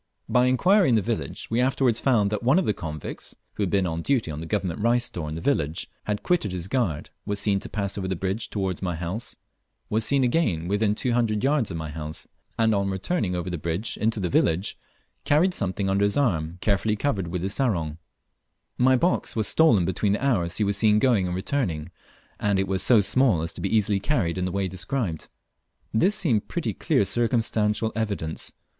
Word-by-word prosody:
By 125 0 +3
inquiry 180 - +4
in 120 - +4
the 110 - +3
village, 115 +1 -3
we 115 +2 +2
afterwards 125 -2 +2
found 110 -7 +2
that 105 - -1
one 130 +7 +3
of 190 - +2
the 105 - +1
convicts 75 -6 -6 0.2
who 100 - -1
was 95 +1 +1
on 85 -1 -2
duty 120 - 0
at 75 - -5
the 80 - -6
Government 95 -3 -2
rice 120 +2 +2
store 85 -9 -5
in 75 - -5
the 80 - -5
village 80 - -1
had 105 -1 -2
quitted 170 - +1
his 90 -1 -4
guard, 95 - -1
was 100 - -2
seen 100 -1 +2
to - - -8
pass 100 -1 -2
over 95 - -3
the 95 - -1
bridge 95 +5 -2
towards 95 -4 -2
my 90 -3 -2
house, 90 +8 -4 0.6
was 110 +1 +2
seen 140 +3 +3
again 115 - +1
within 105 +2 +1
two 125 +2 0
hundred 115 -3 +1
yards 140 -4 +2
of 85 - -4
my 80 -2 -5
house, 75 0 -7 0.3
and 115 -1 +3
on 100 -1 0
returning 95 - -1
over 90 0 -3
the 85 -2 -3
bridge 85 +7 -2
into 110 0 0
the 90 - -1
village 85 +3 +1 0.5
carried 170 +6 +3
something 95 - -1
under 95 +1 +1
his 100 - +1
arm, 85 - 0
carefully 105 +1 +1
covered 105 -7 -1
with 90 +1 -3
his 95 +1 -1
sarong. 85 - -1 0.8
My 130 +1 +5
box 175 +8 0
was 110 -2 +1
stolen 115 - +4
between 100 +2 0
the 125 - -1
hours 90 -11 +1
he 110 - +1
was 100 -1 0
seen 105 0 +4
going 105 -5 +3
and 90 - -2
returning, 95 - -2 0.5
and 100 -1 +1
it 95 0 0
was 95 0 0
so 115 -4 +5
small 105 -3 +2
as 85 - -4
to - - -7
be 100 - -1
easily 100 -1 +1
carried 95 - 0
in 90 - -1
the 90 - -2
way 100 +1 -1
described. 95 - -3 0.7
This 185 - +3
seemed 125 - +1
pretty - - -2
clear 100 - +1
circumstantial 110 -2 +1
evidence. 100 -8 -3
105 Hz, 210 wpm, -25 LUFS, 90-120 Hz, 0.8 s, My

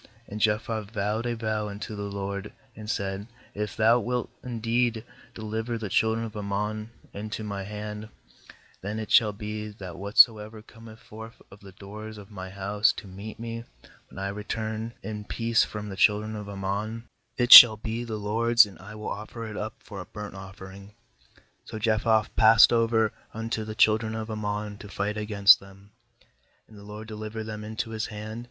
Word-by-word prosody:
30And 105 - -5
Jephthah 110 +1 0
vowed 105 +2 -1
a 120 - -1
vow 110 -2 -2
unto 105 +1 -7
the 100 0 -5
LORD, 100 0 -5 0.2
and 105 -1 -9
said: 100 0 -3 0.3
'If 105 -1 -4
Thou 115 +2 +5
wilt 125 +1 -2
indeed 115 -1 -1 0.3
de - - -8
liver 110 +2 -3
the 110 -3 -5
children 110 +3 +1
of 110 - -9
Ammon 105 +1 -3 0.2
into 110 +2 -5
my 100 -2 -4
hand, 105 +1 -7 0.7
81then 105 +2 -4
it 110 -1 -5
shall 110 -2 +6
be, 105 +1 -6
that 100 -4 -9
whatso 105 +3 +6
ever 105 +1 -10
cometh 115 -1 -14
forth 110 +1 -11
of 100 - -14
the 100 -2 -14
doors 105 +3 -9
of 105 0 -12
my 95 -2 -7
house 100 +2 +1
to 115 - -9
meet 100 +3 -9
me, 115 0 -5 0.5
when - - -15
I 95 +1 -3
return 110 +2 -4
in 105 -1 -5
peace 115 +2 +1
from 105 0 -6
the 95 - -6
children 105 +2 +2
of 105 -1 -7
Am 100 -1 -7
mon, 110 +4 -3 0.3
it 120 0 +7
shall 110 -3 +13
be 110 +2 -4
the 110 -2 -4
LORD'S, 115 +3 +4
and 100 -2 -14
I 105 +3 -11
will 105 0 -6
offer 110 +3 -6
it 110 -1 -7
up 110 +2 -4
for 100 -3 -8
a - - -9
burnt 105 -1 -8
offering/ 95 +1 -11 0.8
^So 110 - -5
Jephthah 110 0 +2
passed 115 +1 +7
over 115 -2 +2 0.2
unto 115 0 -3
the 110 0 -7
children 110 +1 +3
of 110 0 -5
A - - -3
mm 105 - -6
on 105 0 -3
to 105 - -10
fight 100 +1 -2
against 105 0 +5
them; 100 +1 -17 0.8
and 110 - -17
the 100 - -12
LORD 105 +1 -9
delivered 110 0 -6
them 105 -1 -6
into 110 +1 -4
his 110 -1 -3
hand. 110 +1 -7
105 Hz, 190 wpm, -26 LUFS, 105-110 Hz, 0.8 s, shall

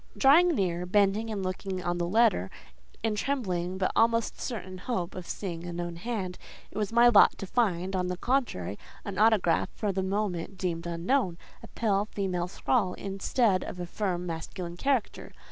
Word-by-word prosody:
Drawing 325 +5 +6
near, 180 -3 -1
bending 205 +3 +2
and 205 -3 -3
looking 185 0 -3
on 175 0 -1
the 170 - 0
letter, 205 - +3 0.5
in 225 -1 +1
trembling 190 -8 -1
but 185 -1 0
almost 230 0 +2
certain 190 -6 -5
hope 185 -5 -3
of 180 -2 -7
seeing 170 -4 -5
a 175 - -5
known 175 0 -4
hand, 190 -2 -4 0.3
it - - -9
was 210 -1 -1
my 235 +1 +6
lot 215 -4 +6
to - - -5
find, 190 -4 0
on 180 -1 0
the 180 0 -3
contrary, 205 - -1 0.3
an 200 -2 -4
autograph 210 -7 +3
for 210 - -1
the 190 0 -1
moment 190 -2 -2
deemed 170 -2 -2
unknown—a 175 +2 -2
pale 205 -3 +1
female 185 -4 -2
scrawl, 190 0 0
instead 195 +1 +1
of 180 - -7
a 175 - -3
firm, 180 -1 -2
masculine 170 +1 -5
character. 260 +3 -1
190 Hz, 170 wpm, -28 LUFS, 175-220 Hz, 0.5 s, Drawing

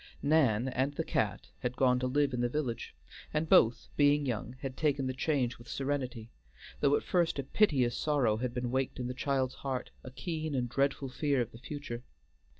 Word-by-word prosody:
Nan 135 -6 +3
and 130 +3 -1
the - - -1
cat - - -1
had 125 0 -2
gone 125 -1 +3
to 130 - 0
live 140 +1 +1
in 120 - 0
the 120 - +1
village, 125 -4 -3 0.4
and 155 +1 0
both, 115 -5 +5
being 145 0 +4
young, 120 -1 -3
had 135 -2 -4
taken 145 -3 +1
the 130 - -1
change 130 -3 0
with 120 - -14
serenity; 130 -5 -3 0.5
though 145 0 +4
at - - -1
first 175 -4 +1
a 140 - -1
piteous 135 - +2
sorrow 135 -8 +2
had 125 +1 -2
been 125 0 -3
waked 130 0 -1
in 125 - -2
the 125 - -3
child's 130 -1 0
heart, 130 -2 -3
a - - -7
keen 155 +2 -3
and 125 -2 0
dreadful 135 +2 0
fear 140 +1 0
of 120 -1 -1
the 115 - -12
future. 140 -2 -6
130 Hz, 200 wpm, -31 LUFS, 125-145 Hz, 0.5 s, both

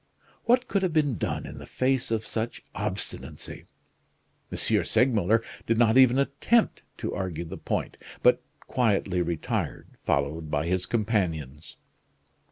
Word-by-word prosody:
What 250 +1 +3
could 200 - +1
have 185 -4 0
been 145 -7 +2
done - - -2
in - - -8
the - - -10
face 130 0 0
of 110 -1 -1
such 115 +1 -4
obstinacy? 100 -1 -5 0.9
M. - - +2
Segmuller 115 -2 +3 0.2
did 115 - +2
not 115 -1 +4
even 130 -1 +7
attempt 140 +12 +2 0.2
to - - -3
argue 90 -3 -3
the 80 - -7
point, - - -2 0.3
but - - +5 0.2
quietly 100 -7 +1
retired, 85 -2 -2
followed 75 +3 0
by 75 +1 0
his 90 +1 0
companions. 85 - -1
110 Hz, 135 wpm, -27 LUFS, 85-130 Hz, 0.9 s, even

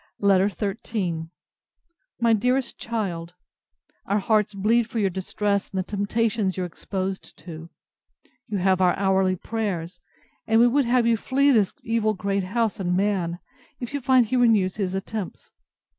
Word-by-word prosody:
LETTER 195 -1 +4
XIII 195 -4 -3 0.9
My 235 -1 +4
DEAREST 250 +4 0
CHILD, 180 -7 -4 0.7
Our 200 - +2
hearts 210 0 +1
bleed 225 +4 +2
for 235 - -5
your 200 -3 +1
distress, 200 +2 -1
and 195 - -6
the 185 - +1
temptations 205 0 -1
you 185 - -1
are - - -1
exposed 190 +2 -5
to. 165 0 -10 0.8
You 205 - -2
have 190 0 +2
our 180 -1 +3
hourly 190 -1 +2
prayers; 185 -4 -4 0.5
and 225 +1 +4
we 235 - +7
would 265 +3 +3
have 240 0 +3
you 230 -1 +3
flee 275 +5 +2
this 210 -7 +2
evil 220 -1 0
great 195 0 -1
house 225 +2 -1
and 180 -1 0
man, 190 -4 0 0.4
if 245 +1 -6
you 285 - -2
find 255 -1 +4
he 230 - -2
renews 215 -6 +3
his 190 -3 -2
attempts. 195 0 -5
200 Hz, 160 wpm, -24 LUFS, 185-230 Hz, 0.9 s, we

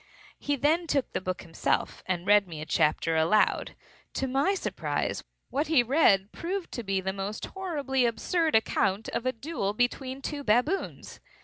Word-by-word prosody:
He 290 - 0
then 315 +5 +1
took 280 -3 0
the - - -1
book 185 -1 -4
himself, 165 -3 -1
and 180 -1 -1
read 205 -1 +5
me 160 -3 -7
a 155 - -5
chapter 160 +1 +1
aloud. 165 +7 +2 0.4
To 270 - 0
my 275 +9 +1
surprise, - - -2 0.3
what 290 +3 0
he 305 -6 +4
read 215 -7 +3
proved 365 +1 -4
to 240 - -4
be 195 -3 -1
a 190 0 -2
most 200 +2 -4
horribly 285 -9 -1
absurd 320 +7 0
account 210 -2 +1
of 245 - -2
a - - +3
duel 250 -5 -3
between 260 +3 -1
two 290 -2 -4
baboons. 250 - 0
245 Hz, 170 wpm, -28 LUFS, 195-290 Hz, 0.4 s, read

